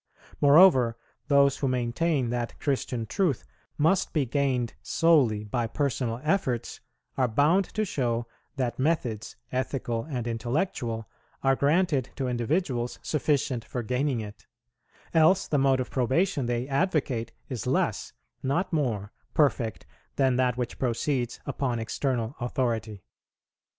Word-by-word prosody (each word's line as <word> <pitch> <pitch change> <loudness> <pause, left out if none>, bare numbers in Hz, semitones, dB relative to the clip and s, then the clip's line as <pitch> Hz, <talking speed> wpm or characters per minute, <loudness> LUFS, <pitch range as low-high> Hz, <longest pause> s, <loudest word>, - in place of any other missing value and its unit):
Moreover, 140 -6 +6 0.3
those 140 -2 +4
who 140 - -1
maintain 130 +2 0
that 120 -1 -3
Christian 125 -4 -1
truth 160 - 0 0.3
must 165 +5 +2
be 150 -4 +2
gained 130 -2 0
solely 135 -11 +3
by 115 +2 -1
personal 120 -2 -1
efforts 140 - -1 0.4
are 130 -2 +3
bound 150 - +3
to 215 0 +1
show 120 - -1 0.3
that 125 -2 -2
methods, 125 -7 -1 0.2
ethical 125 -3 -2
and 125 -6 -4
intellectual, 120 - -2 0.4
are 135 0 +4
granted 145 -2 +2
to 135 - -2
individuals 125 0 -1
sufficient 140 -5 0
for 120 0 -4
gaining 125 +1 0
it; 105 0 -10 0.7
else 165 +3 +4
the 145 - +1
mode 135 -1 +3
of 125 - -3
probation 135 +2 +1
they 120 +1 -1
advocate 135 - 0 0.2
is 125 -7 -5
less, - - 0 0.3
not 170 +8 -1
more, 110 -10 -1 0.2
perfect 130 -7 +1 0.3
than 130 -2 +3
that 125 -1 +1
which 125 -1 -4
proceeds 120 0 -1
upon 130 -3 -1
external 115 +2 -2
authority. 115 -5 -2
130 Hz, 125 wpm, -27 LUFS, 120-145 Hz, 0.7 s, Moreover